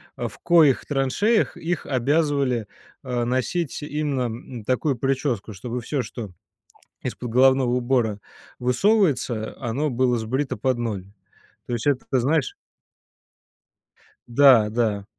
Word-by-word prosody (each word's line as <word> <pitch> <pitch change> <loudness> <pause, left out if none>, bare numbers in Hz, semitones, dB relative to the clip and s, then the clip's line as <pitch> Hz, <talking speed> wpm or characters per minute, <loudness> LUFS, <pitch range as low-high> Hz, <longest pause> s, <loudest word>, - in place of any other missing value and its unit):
а, 120 - -3
в 100 - -11
коих 155 -9 +4
траншеях 150 - +1
их 165 -1 -3
обязывали, 140 -3 +1 0.3
а, 125 -2 -2
носить 135 +6 -1
именно, 150 -3 -2
м, 120 0 -6
такую 130 +2 0
прическу, 130 -4 -1
чтобы 120 +5 -5
всё, 130 +2 -2
что 105 -1 -7 0.7
из-под 120 -2 -5
головного 130 0 +4
убора 120 -4 +1 0.4
высовывается, 125 - +1
а, 120 - -4
оно 145 +5 -1
было 125 -1 +1
сбрито 130 +5 -2
под 125 +3 0
ноль. 105 -6 -3 0.6
То 120 - -2
есть 120 +4 -4
это, 140 -3 +1
ты 130 - +2
знаешь 145 +2 +1 1.7
Да 120 -4 +6
да. 105 -3 -1
125 Hz, 125 wpm, -23 LUFS, 120-145 Hz, 1.7 s, Да